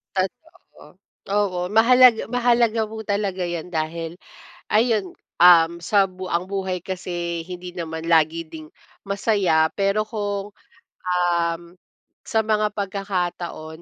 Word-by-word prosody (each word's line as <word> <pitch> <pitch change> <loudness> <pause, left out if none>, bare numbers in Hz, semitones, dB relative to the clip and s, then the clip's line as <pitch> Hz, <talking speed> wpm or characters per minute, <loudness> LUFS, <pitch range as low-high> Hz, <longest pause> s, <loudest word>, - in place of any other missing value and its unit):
Totoo. 250 - -6 0.3
Oo 200 -3 0
mahalag 235 +3 +6
mahalaga 235 -2 +2
po 220 +1 -8
talaga 200 -2 -2
yan 175 -1 -4
dahil 165 0 -4 0.5
ayun, 215 -4 +1 0.2
um, 170 -1 +6
sa 200 +4 +3
bu 185 -1 -6
ang 170 0 0
buhay 190 -3 -3
kasi 175 -3 -4
hindi 180 0 -7
naman 165 -2 -6
lagi 165 +1 +3
ding 155 -1 -11 0.4
masaya. 195 -6 +2
Pero 200 +2 0
kung, 205 -2 -4 0.5
um, 175 -2 0 0.6
sa 225 - 0
mga 215 -1 +1
pagkakataon 180 -5 -4
185 Hz, 115 wpm, -22 LUFS, 170-210 Hz, 0.6 s, mahalag